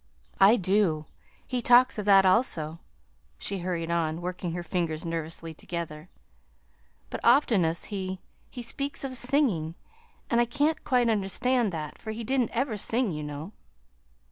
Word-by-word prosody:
"I 200 +4 +7
do; 185 -6 +1 0.4
he 250 -1 -2
talks 245 -1 +5
of 205 - -3
that, 195 -1 +6
also," 170 -6 +2 0.6
she 195 - -3
hurried 170 -2 -3
on, 165 -1 0
working 175 -1 -4
her 175 0 -4
fingers 170 -3 -2
nervously 165 0 -4
together; 165 0 -6 1.0
"but - - -4
oftenest 220 - +3
he 190 -1 -3 0.3
he 245 - -7
speaks 275 +5 -3
of 265 -1 -4
singing, 245 - +1 0.5
and 235 0 +3
I - - +3
can't 290 +6 0
quite 245 -2 +2
understand 225 +2 +1
that, 155 -2 -6
for - - -8
he 230 +1 -5
didn't 255 0 +1
ever 235 -2 -1
sing, 225 +1 +1
you 150 -2 -4
know." 150 +4 -6
195 Hz, 145 wpm, -27 LUFS, 165-240 Hz, 1.0 s, I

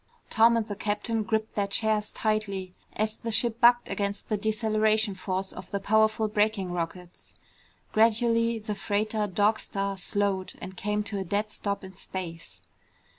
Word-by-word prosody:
Tom 230 +1 +5
and 225 - 0
the 205 -2 -5
captain 215 +2 -1
gripped 220 0 -1
their 200 -1 0
chairs 215 +1 +1
tightly 200 -4 -1 0.2
as 215 +1 -1
the 230 - -5
ship 230 +1 0
bucked 240 0 +6
against 200 -1 -3
the 215 - +2
deceleration 215 0 +1
force 190 0 -3
of 185 0 -9
the 200 - -2
powerful 220 +2 +3
braking 210 -3 +1
rockets. 175 +1 -6 0.6
Gradually 230 +1 +3
the 215 -1 -4
freighter 210 +1 -1
Dog 205 +3 +2
Star 195 0 -3
slowed 195 0 -1
and 190 +1 -8
came 210 +2 -1
to 205 -1 -4
a - - -2
dead 205 +3 -1
stop 200 -1 -3
in 190 0 -10
space. 170 -3 -5
210 Hz, 160 wpm, -27 LUFS, 195-220 Hz, 0.6 s, bucked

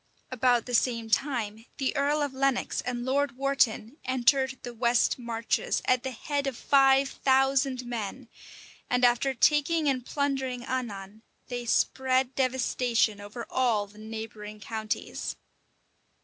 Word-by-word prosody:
About 245 -2 +2
the 245 - -6
same 230 -2 +1
time, 225 -3 -1
the 270 +1 -1
earl 290 +1 +1
of 285 -2 -3
Lenox 270 -1 0
and 245 -1 -3
Lord 275 0 0
Wharton 275 -2 +1
entered 260 +1 +2
the 245 - -6
west 235 +1 +2
marches, 230 -1 -1
at 255 -1 +3
the 265 - -3
head 280 +3 -3
of 265 -4 -3
five 270 -1 +4
thousand 270 -1 +1
men; 240 +1 -5 0.6
and 250 0 +3
after 245 +2 +2
taking 300 +5 +3
and 260 -3 +1
plundering 265 -3 -2
Annan, 215 -5 -5 0.3
they 245 -1 -4
spread 260 +2 +1
devastation 250 -4 +1
over 210 +4 -7
all 235 -5 +1
the 205 +1 -17
neighboring 215 -1 -7
counties. 215 +1 -4
250 Hz, 135 wpm, -28 LUFS, 230-270 Hz, 0.6 s, five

